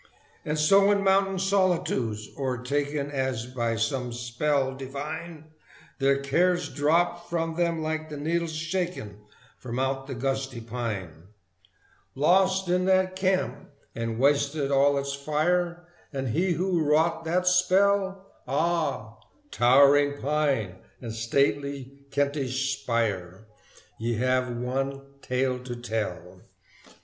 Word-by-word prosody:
And 150 0 -2
so 195 +6 +5
in 200 -1 +2
mountain 195 0 +3
solitudes 180 - 0
o'ertaken 140 +2 -2
As 130 -4 -2
by 120 -2 -2
some 120 +3 -1
spell 130 +3 -1
divine 155 +4 -7 0.5
Their 135 0 +3
cares 175 +6 +1
dropped 170 +4 +1
from 165 -1 -1
them 170 -1 0
like 155 0 -3
the 150 - -6
needles 165 +3 -1
shaken 165 - -3 0.4
From 120 -1 -6
out 135 +1 -1
the 135 - -5
gusty 135 0 -2
pine. 110 -8 -5 0.9
Lost 190 +6 +3
is 180 +1 +2
that 185 0 +3
camp 185 0 -1 0.2
and 115 -1 -3
wasted 140 +2 +2
all 140 +1 +4
its 140 0 -2
fire: 170 +5 0 0.3
And 135 -3 -3
he 175 +9 +1
who 180 0 0
wrought 160 +2 +2
that 180 +3 +1
spell? 190 +1 +3 0.2
Ah! 150 -6 -1 0.3
towering 140 +3 +5
pine 135 -10 0 0.2
and 115 -3 -6
stately 140 +3 -1
Kentish 135 -1 -1
spire, 105 -5 -2 0.5
Ye 115 +1 -1
have 130 +2 +1
one 135 +3 -3 0.2
tale 130 0 -1
to 125 -1 -6
tell! 105 -7 -4
140 Hz, 120 wpm, -26 LUFS, 125-170 Hz, 0.9 s, so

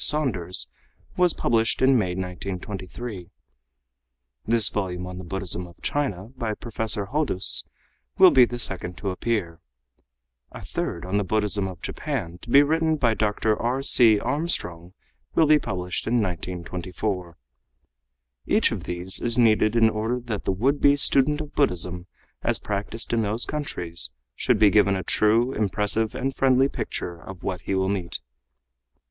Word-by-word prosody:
Saunders 115 - +2 0.5
was 180 -2 +3
published 115 +1 +1
in 130 +1 +4
May, 95 -7 0
1923; 95 +2 -6 1.2
this 115 -2 +4
volume 90 -3 -3
on 90 0 -7
the - - -7
Buddhism 90 -1 -2
of 85 - -18
China 115 -9 -2
by 115 -4 -3
Professor 110 -3 -2
Hodous 145 -11 +3 0.5
will - - +8
be 130 - +7
the 120 0 -1
second 95 -5 -2
to 95 0 -3
appear; 90 -5 -2 0.9
a - - -10
third 85 0 -4
on 95 +2 -1
the 105 - +1
Buddhism 105 0 +1
of 90 -2 -10
Japan, 100 - -4
to - - -12
be 140 +4 +7
written 160 +1 +1
by 120 -6 +2
Dr. 110 0 0
R. 125 +5 -2
C. 115 -6 +6
Armstrong, 110 - -2 0.4
will 160 - +5
be 150 0 +5
published 90 -6 -4
in 115 - +1
1924. 90 -1 -3 1.1
Each - - +2
of - - -5
these 90 +2 0
is 120 0 0
needed 110 -2 +3
in 115 -1 +5
order 110 +3 -1
that 120 -4 -5
the - - +1
would 130 +10 0
be 140 0 +5
student 145 +1 +3
of 150 -1 -8
Buddhism 90 - 0 0.3
as - - 0
practiced 105 +3 -4
in 115 - +2
those 110 +3 0
countries 85 - -1 0.3
should 125 - +1
be 105 -1 +5
given 105 -2 +4
a 95 - -3
true, 115 +8 +2
impressive 105 +2 -1
and 135 0 -3
friendly 135 0 +3
picture 85 -10 -5
of 95 -2 -11
what 90 -2 -3
he 95 - -2
will 95 0 +1
meet. 95 -4 -3
105 Hz, 155 wpm, -24 LUFS, 90-125 Hz, 1.2 s, will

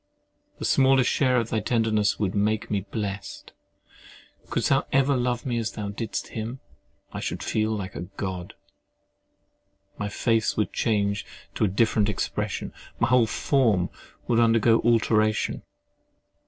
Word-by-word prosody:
The - - -4
smallest 135 -1 +4
share 130 -3 +2
of 115 -2 -1
thy 110 - +1
tenderness 110 -2 +1
would 100 -3 -1
make 105 +1 0
me 100 -1 -1
blest; 100 -2 -5 0.9
but - - -28
couldst - - 0
thou - - +2
ever 135 +1 +3
love 125 0 -1
me 120 -3 -1
as 110 - -3
thou 105 -1 -4
didst 110 +2 -4
him, 115 +4 -5 0.5
I - - -4
should - - -4
feel 110 0 0
like 95 -2 -5
a 85 +5 -6
God! 95 -3 -5 1.4
My 100 - -2
face 115 +2 +1
would 105 - 0
change 105 -3 0 0.3
to - - +1
a - - +2
different 105 +1 +2
expression: 105 - -3 0.3
my 120 - +2
whole 125 -2 +4
form 110 -8 +1 0.4
would 120 -1 +3
undergo 115 0 +4
alteration. 110 -2 +2
110 Hz, 145 wpm, -25 LUFS, 105-120 Hz, 1.4 s, smallest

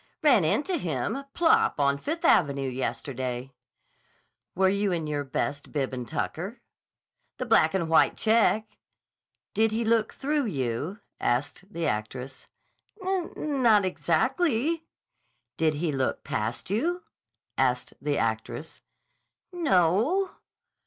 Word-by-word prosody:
"Ran 255 - +6
into 300 - +1
him, 170 - -2
plop, 335 - +3
on 140 0 +2
Fifth 330 - -3
Avenue 140 - +3
yesterday." 130 0 -3 1.0
"Were 190 +1 +4
you 200 +1 +1
in 165 -3 -1
your 150 -1 -2
best 140 +1 -3
bib 135 -3 -1
and 125 -2 -4
tucker?" 185 +8 -4 0.8
"The 255 - -3
black 195 -7 +4
and 170 -4 0
white 160 0 +4
check." 220 -1 +2 0.7
"Did 220 0 +3
he 225 +1 -1
look 225 -1 +2
through 290 0 -1
you?" 145 - -3 0.2
asked 145 - -1
the 170 -3 -3
actress. 125 +5 -4 0.6
"N 335 -7 -2
not 215 -5 +5
exactly." 265 - +1 0.7
"Did 160 -2 +1
he 160 +1 -1
look 135 -2 -1
past 115 - -3
you?" 345 - 0 0.5
asked 125 -1 0
the 145 -1 0
actress, 115 +6 -3 0.7
"N 345 -3 -3
o 180 -8 +5
o 245 - +2
o." - - -20
175 Hz, 125 wpm, -27 LUFS, -, 1.0 s, Ran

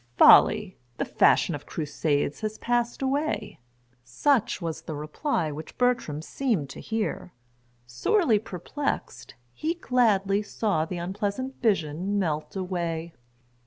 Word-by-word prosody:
"Folly! 210 -3 +6 0.2
the - - -1
fashion - - +3
of - - -7
crusades 150 -1 -1
has 215 0 -3
passed 240 +2 -1
away:" 270 - -1 0.4
such 220 - +1
was 165 -3 -4
the 155 - -6
reply 155 - -2
which 155 +2 -9
Bertram 240 -12 0
seemed 195 - -1
to - - -9
hear. 220 -5 -3 0.5
Sorely 220 - +2
perplexed, 220 - -4 0.2
he 320 - -2
gladly 210 - +2
saw 205 -6 -1
the 180 +2 -5
unpleasant 205 +9 -3
vision 190 -2 0
melt 155 -5 -2
away. 170 -3 -3
200 Hz, 120 wpm, -26 LUFS, 160-240 Hz, 0.5 s, Folly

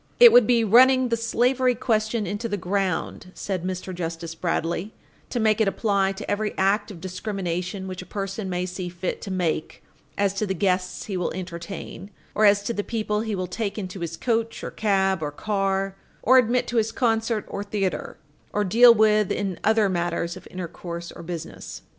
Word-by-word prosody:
"It 480 -1 +10
would 245 -3 +7
be 240 -2 +4
running 255 +4 +6
the 230 - +2
slavery 245 +2 +1
argument 220 -3 0
into 205 +5 -3
the 205 - -1
ground," 185 -1 -2
said 190 -4 -3
Mr. 185 0 -4
Justice 165 -1 -5
Bradley, 170 +3 -2 0.3
"to 245 - -2
make 220 -1 +3
it 215 - +3
apply 195 -1 +1
to 190 - -6
every 210 +1 -1
act 200 +3 +2
of 195 -5 -9
discrimination 185 0 -4
which 185 -1 -6
a 180 - -11
person 195 +1 -4
may 180 0 -1
see 180 0 -5
fit 175 +1 -4
to 200 - -6
make 175 -4 -2 0.3
as 200 -1 +2
to 205 +1 -2
the 190 - -1
guests 185 0 0
he 200 - -4
will 180 -1 -1
entertain, 185 +1 -7 0.2
or 215 - +3
as 200 0 +5
to 235 - -2
the 205 - -2
people 215 -2 -1
he 220 -2 -2
will 185 -1 -2
take 200 +3 -3
into 190 -2 -5
his 165 -1 -4
coach 230 -2 -1
or - - -4
cab 195 -4 +1
or 150 - -1
car, 195 +3 -1 0.3
or 260 +3 +7
admit 245 +1 +2
to 240 - -1
his 225 0 +2
concert 225 -2 0
or 200 - -4
theatre, 195 -5 -3 0.4
or 210 - +1
deal 235 +5 +7
with 215 -2 +3
in 190 -4 -2
other 220 -1 +4
matters 175 -1 -1
of - - -11
intercourse 170 -1 -6
or - - -10
business." 170 -1 -7
195 Hz, 190 wpm, -24 LUFS, 180-220 Hz, 0.4 s, It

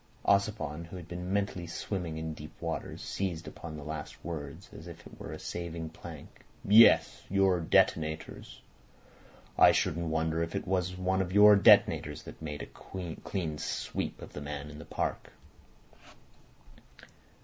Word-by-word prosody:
Ossipon, 100 -6 +1
who 85 - -10
had 90 -2 -8
been 90 +1 -5
mentally 100 -3 -1
swimming 85 -2 -4
in 80 0 -4
deep 75 0 -11
waters, 85 -1 -4
seized 90 -4 -3
upon 80 -2 -8
the 75 - -8
last 75 0 -7
word 80 -3 -5 0.2
as 80 - -10
if 85 0 -11
it - - -13
were - - -7
a - - -6
saving 85 -2 -5
plank. - - -11 0.2
"Yes. 110 +3 +7
Your 95 -2 +3
detonators. 80 -1 0 1.0
I - - +9
shouldn't 85 +1 0
wonder 80 +1 0
if 85 - -3
it - - -2
weren't 90 0 0
one 95 +1 +1
of 90 -1 -3
your 105 +1 +8
detonators 100 - +5
that - - -11
made 75 -2 -5
a 90 -4 -7
clean 80 -6 -3
sweep - - -3
of - - -11
the 75 - -6
man 75 0 -6
in 75 - -10
the - - -9
park." - - -3
85 Hz, 155 wpm, -30 LUFS, 80-95 Hz, 1.0 s, I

